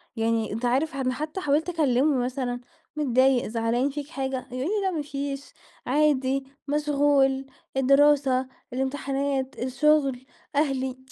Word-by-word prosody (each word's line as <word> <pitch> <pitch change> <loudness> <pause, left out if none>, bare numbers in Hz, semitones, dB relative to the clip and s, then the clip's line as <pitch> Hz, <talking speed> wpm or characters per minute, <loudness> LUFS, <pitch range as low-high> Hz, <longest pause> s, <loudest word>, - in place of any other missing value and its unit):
يعني 225 -1 0
أنت 230 +3 -3
عارف 275 +5 +1
أنا 255 -2 0
حتّى 305 +7 -4
حاولت 300 +2 +1
أكلّمه 285 -4 +2
مثلًا، 250 -1 -3 0.3
متضايق 260 -3 +3
زعلان 230 +4 0
فيك 285 0 -5
حاجة 265 -4 -3
يقول 255 - -4
لي: 410 +3 0
"لأ 380 - +1
مافيش، 280 -3 -4 0.3
عادي، 275 -1 +2 0.2
مشغول، 285 -2 +2 0.3
الدراسة، 275 -1 +4 0.3
الامتحانات، 270 0 -2
الشغل، 270 0 +2 0.3
أهلي" 265 -3 0
270 Hz, 120 wpm, -26 LUFS, 255-290 Hz, 0.3 s, الدراسة